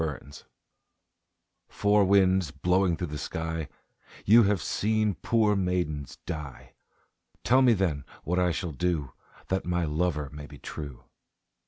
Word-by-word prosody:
Four 80 - 0
Winds 70 +3 -14 1.2
"Four 105 0 +2
winds 95 -3 +3
blowing 90 +4 +1
thro' 90 - -2
the 75 -2 -6
sky, 80 -1 -4 0.6
You 115 +4 +7
have 100 -1 +2
seen 110 +4 0
poor 105 +5 +1
maidens 90 -7 -2
die, 70 -7 -7 0.7
Tell 130 +3 +4
me 125 -3 +6
then 85 -9 0 0.2
what 90 +3 0
I 90 -1 +3
shall 85 0 -3
do 75 -4 -2 0.4
That 95 0 0
my 90 -1 0
lover 75 -2 -1
may 75 0 -9
be 75 - -12
true." 70 -1 -8
90 Hz, 140 wpm, -27 LUFS, 75-95 Hz, 1.2 s, You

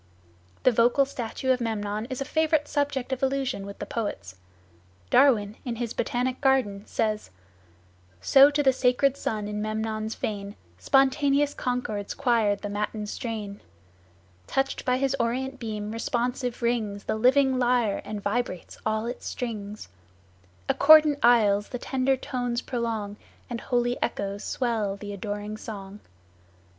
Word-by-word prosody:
The 255 - +6
vocal 240 +4 +4
statue 260 -1 -3
of 250 -1 +1
Memnon 215 -1 -2
is 260 0 -4
a - - -1
favorite 310 0 +1
subject 280 -3 -1
of 260 - -4
allusion 265 -7 -1
with 200 - -8
the - - -5
poets. 205 - -4 0.8
Darwin, 220 -7 +4
in 240 -2 -3
his 235 -1 -3
"Botanic 250 +1 -1
Garden," 255 -8 +1
says: 215 -1 -1 0.9
"So 275 - +7
to 290 0 0
the 265 -1 +5
sacred 255 +2 +2
Sun 215 -6 -3
in 210 0 -3
Memnon's 215 0 -3
fane 200 -1 -4 0.2
Spontaneous 280 - +3
concords 240 -5 -3
choired 230 -7 +2
the - - -2
matin 210 +1 -3
strain; 210 -2 -5 0.9
Touched 270 0 -1
by 250 -1 +2
his 275 0 +1
orient 260 +3 -1
beam 215 -2 -4
responsive 245 +2 -2
rings 220 -4 -1
The - - -1
living 260 +3 +3
lyre 240 -4 +2
and 210 -1 -6
vibrates 205 -4 -3
all 220 +1 0
its 245 +1 -5
strings; 215 -4 -5 0.8
Accordant 305 0 +6
aisles 205 -4 +4
the 245 - -4
tender 265 +1 0
tones 245 -1 -3
prolong, 225 -4 -3 0.3
And 235 - -3
holy 245 -1 0
echoes 200 -2 -2
swell 220 -6 -1
the 205 0 -7
adoring 205 +1 -5
song." 200 -2 -8
235 Hz, 140 wpm, -26 LUFS, 210-260 Hz, 0.9 s, So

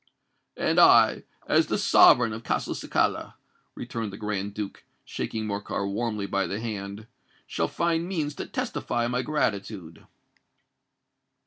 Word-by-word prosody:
"And - - +2
I, - - +6 0.2
as - - +3
the - - 0
sovereign 115 -3 +6
of 110 - -6
Castelcicala," - - -1 0.4
returned 115 -3 -5
the 95 - -9
Grand 105 -2 -3
Duke, 105 -2 -6 0.2
shaking 110 -1 -4
Morcar 100 -1 -3
warmly 105 0 -2
by 100 0 -1
the 100 - -3
hand, 105 -2 -5 0.4
"shall 80 - -1
find 170 - -1
means 155 -6 -2
to - - -5
testify 120 0 -2
my 125 +1 0
gratitude." 100 - -3
105 Hz, 125 wpm, -26 LUFS, 100-120 Hz, 0.4 s, I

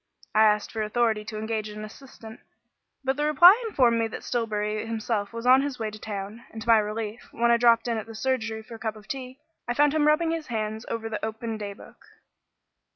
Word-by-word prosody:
I 215 - +4
asked 210 -1 +2
for 220 - -3
authority 220 0 +1
to 215 0 -6
engage 215 0 -3
an 210 0 -7
assistant, 225 -1 -12 0.6
but 265 +1 0
the 295 - 0
reply 350 - +7
informed 240 - +3
me 225 - +1
that 220 - -8
Stillbury 215 -3 -2
himself 220 -2 -2
was 230 +1 -7
on 260 +2 +7
his 280 -2 -3
way 220 -2 -3
to 215 - -10
town; 210 +2 -6
and 225 - -9
to 225 - -9
my 225 -1 +7
relief, 215 +1 -4
when 235 +1 +2
I 235 - +5
dropped 235 0 +4
in 230 -1 0
at 220 - -8
the 225 - -9
surgery 220 -2 -2
for 235 - -12
a 225 - -9
cup 220 -1 -3
of 210 -2 -14
tea, 260 -1 -6 0.3
I 240 - -1
found 290 +1 +4
him 305 -1 +2
rubbing 325 +2 +3
his 330 -2 -3
hands 220 -1 -3
over 230 -1 -3
the 215 -1 -5
open 220 +1 -4
day 205 -2 -5
book. - - -16
225 Hz, 225 wpm, -26 LUFS, 215-250 Hz, 0.6 s, reply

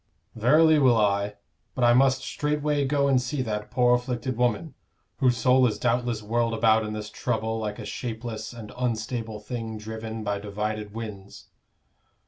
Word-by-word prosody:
"Verily 155 +7 +5
will 125 -4 +5
I. 100 -1 +1 0.4
But 125 - -1
I 120 0 +6
must 130 +1 +3
straightway 150 0 0
go 140 0 +2
and 130 -2 +3
see 130 +1 -2
that 105 -2 -4
poor 125 -1 +3
afflicted 125 0 -1
woman, 125 +6 0 0.4
whose 125 -3 +2
soul 125 +2 +4
is 105 - -2
doubtless 120 -2 0
whirled 115 +1 0
about 110 -1 +4
in 105 0 -4
this 105 -1 -6
trouble 110 -2 -2
like 105 -1 -3
a 110 - -7
shapeless 110 0 -5
and 115 -3 -9
unstable 115 -2 -3
thing 115 0 -5
driven 110 +1 -6
by 100 -1 -1
divided 105 +1 -4
winds." 105 -3 -8
115 Hz, 160 wpm, -26 LUFS, 110-125 Hz, 0.4 s, I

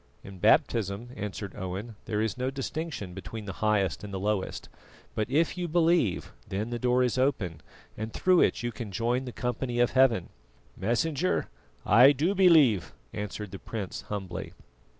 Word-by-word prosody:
"In 95 -1 -10
baptism," 105 +4 +2
answered 100 -3 -5
Owen, 100 +4 -5
"there 105 -1 -1
is 110 - -1
no 130 0 -1
distinction 135 - -4
between 105 +3 -7
the 95 - -5
highest 105 -5 +1
and 105 - -7
the 95 - -3
lowest; 100 -1 -2 0.5
but 110 +1 -2
if 160 +6 +1
you 175 - -1
believe, 165 - +2 0.2
then 105 +5 -3
the 120 - -2
door 125 +1 +3
is 125 0 0
open 95 - 0 0.3
and 110 +1 -5
through 185 +6 +3
it - - +2
you 120 - -1
can 110 -2 -7
join 120 +6 0
the 125 - -5
company 120 0 -2
of 120 - +3
Heaven." 125 -9 +3 0.5
"Messenger, 140 - 0 0.4
I 125 +8 +7
do 160 +8 +1
believe," 160 - +5 0.2
answered 105 -1 -5
the 95 - -7
prince 105 -5 -5
humbly. 95 -5 -5
115 Hz, 165 wpm, -28 LUFS, 100-130 Hz, 0.5 s, I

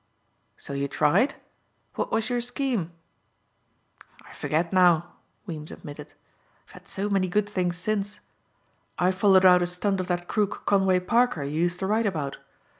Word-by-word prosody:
"So 140 - -8
you 140 0 -1
tried? 155 - +2 0.6
What - - -3
was 220 - 0
your 245 -1 -1
scheme?" 245 - -2 1.3
"I - - -14
forget 165 +4 -1
now," 175 -2 +4 0.3
Weems 155 -5 -7
admitted. 145 0 -10 0.5
"I've - - -21
had - - -15
so 200 +2 -3
many 195 -2 +1
good 205 +3 0
things 180 -4 -1
since. 205 +2 -2 0.8
I 180 +1 +3
followed 190 0 +4
out 180 -1 +7
a 175 - +1
stunt 190 +2 -1
of 185 - -3
that 175 -1 -2
crook, 210 -2 -1
Conway 190 -2 +3
Parker, 230 -3 +1
you 150 +3 -2
used 175 0 +1
to - - 0
write 215 +3 +1
about. 150 -7 -3
185 Hz, 160 wpm, -26 LUFS, 170-205 Hz, 1.3 s, out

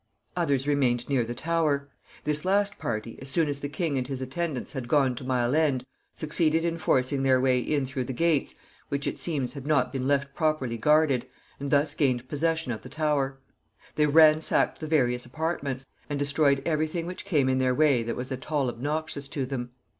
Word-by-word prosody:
Others 140 -1 0
remained 125 -4 +1
near 135 -4 +2
the 120 +1 -5
Tower. 150 -1 0 0.4
This 150 0 0
last 200 +2 +1
party, 110 0 -4
as 135 - -6
soon 160 +3 +2
as 145 -1 -2
the 145 - -4
king 145 -2 -1
and 125 - -3
his 135 -2 -4
attendants 135 +1 -3
had 130 -5 -5
gone 135 -1 +3
to 125 - -8
Mile 125 -1 0
End, 140 -5 +2 0.3
succeeded 160 +1 +1
in 170 0 -1
forcing 135 -1 +1
their 130 -1 +4
way 130 -1 +3
in 140 +2 0
through 130 -1 -3
the 130 - -4
gates, 160 +3 +1 0.3
which, 140 0 -2
it - - -3
seems, 145 -7 -1
had 140 -1 -8
not 135 -5 +2
been 130 -1 -2
left 140 -1 +1
properly 155 -7 0
guarded, 145 0 +3 0.3
and 140 0 -4
thus 145 +1 +2
gained 130 -5 0
possession 160 -1 -1
of 110 - -4
the 125 - -11
Tower. 145 -2 0 0.6
They 150 0 +2
ransacked 155 +1 +5
the 155 - -5
various 125 -6 +2
apartments, 140 -1 -3 0.2
and 145 - -2
destroyed 140 -1 +2
every 155 -1 +1
thing 165 +1 -4
which 180 +1 -6
came 145 -7 +1
in 130 0 +2
their 130 -1 +2
way 145 -5 +4
that 115 0 -3
was 125 +2 -5
at 130 +3 -6
all 140 -4 +1
obnoxious 145 +3 -3
to 140 -1 -3
them. 125 -2 -4
140 Hz, 200 wpm, -27 LUFS, 130-155 Hz, 0.6 s, ransacked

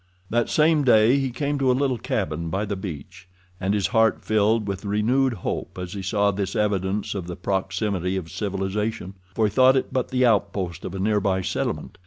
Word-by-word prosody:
That 120 0 +1
same 155 -1 +3
day 120 +1 +5
he 135 -1 -1
came 145 +3 -2
to 135 -1 +2
a 125 - +2
little 130 -3 0
cabin 85 -9 -2
by 95 +5 -1
the 100 0 -3
beach, 90 0 -8 0.3
and 95 +2 0
his 100 -3 0
heart 110 -2 +2
filled 110 0 +2
with 100 0 -4
renewed 115 +6 +1
hope 105 -4 -5
as 90 -1 -5
he 100 - -5
saw 100 +2 +1
this 100 0 -3
evidence 100 -1 0
of 95 -4 -5
the 90 - -5
proximity 95 0 -1
of 85 -3 -6
civilization, 100 0 -3 0.2
for 110 - +2
he 105 - 0
thought 130 +2 +5
it 130 - -2
but 130 -2 0
the 130 0 +2
outpost 100 -6 0
of 95 - -5
a - - -4
nearby 100 -2 +1
settlement. - - -3
105 Hz, 200 wpm, -24 LUFS, 95-115 Hz, 0.3 s, day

